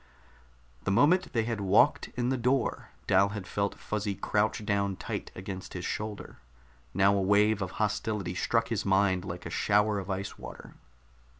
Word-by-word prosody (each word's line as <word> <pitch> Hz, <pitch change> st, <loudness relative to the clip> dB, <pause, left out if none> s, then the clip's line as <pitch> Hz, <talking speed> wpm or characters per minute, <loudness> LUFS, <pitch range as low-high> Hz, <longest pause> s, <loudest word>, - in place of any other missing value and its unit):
The -, -, -2 dB
moment 155 Hz, -, +3 dB
they 115 Hz, -3 st, +1 dB
had 115 Hz, -2 st, -3 dB
walked 100 Hz, +2 st, +4 dB
in 125 Hz, 0 st, 0 dB
the 130 Hz, -, +1 dB
door, 125 Hz, 0 st, 0 dB, 0.2 s
Dal 95 Hz, +1 st, +4 dB
had 100 Hz, -2 st, -6 dB
felt 100 Hz, +2 st, -2 dB
Fuzzy 105 Hz, -2 st, -3 dB
crouch 105 Hz, +2 st, 0 dB
down 100 Hz, -1 st, 0 dB
tight -, -, -5 dB
against 95 Hz, 0 st, -7 dB
his 90 Hz, -1 st, -4 dB
shoulder. 105 Hz, -8 st, -5 dB, 0.5 s
Now 100 Hz, +4 st, +4 dB
a 100 Hz, -, +1 dB
wave 105 Hz, +2 st, +3 dB
of 95 Hz, -1 st, -3 dB
hostility 105 Hz, -2 st, -1 dB
struck 115 Hz, +5 st, 0 dB
his 115 Hz, -3 st, -1 dB
mind 95 Hz, -2 st, +2 dB
like 90 Hz, -2 st, -7 dB
a -, -, -5 dB
shower 105 Hz, 0 st, +2 dB
of 95 Hz, 0 st, -7 dB
ice 95 Hz, +1 st, -4 dB
water. -, -, -10 dB
100 Hz, 170 wpm, -29 LUFS, 95-110 Hz, 0.5 s, walked